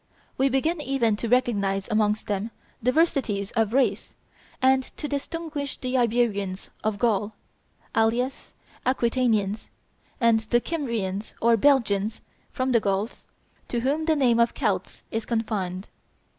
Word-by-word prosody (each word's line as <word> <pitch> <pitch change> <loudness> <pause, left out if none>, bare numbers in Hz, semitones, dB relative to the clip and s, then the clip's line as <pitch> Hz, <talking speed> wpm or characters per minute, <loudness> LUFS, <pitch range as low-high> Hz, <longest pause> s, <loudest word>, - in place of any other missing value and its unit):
We 270 +1 +2
begin 305 +5 0
even 255 -6 +1
to 230 - -3
recognize 200 -6 +1
amongst 215 -1 +1
them 205 +1 -2 0.3
diversities 250 - +1
of 225 -3 +1
race, 265 +2 +1 0.4
and 265 0 +4 0.2
to 300 - -3
distinguish 290 0 -4
the 255 0 -3
Iberians 220 -6 0
of 215 -1 0
Gaul, 210 -1 +1 0.6
alias 235 +4 0 0.3
Aquitanians, 235 -5 +1 0.5
and 230 -2 +4
the 225 +2 +1
Kymrians 230 - -3
or 235 0 +4
Belgians 220 -5 +2 0.3
from 260 -1 -1
the 235 - +5
Gauls, 200 +2 -2 0.4
to 240 - -1
whom 290 +5 0
the 320 -1 +3
name 245 -5 +3
of 235 0 +3
Celts - - -2
is 225 0 -3
confined. 205 -5 -2
235 Hz, 130 wpm, -25 LUFS, 210-260 Hz, 0.6 s, the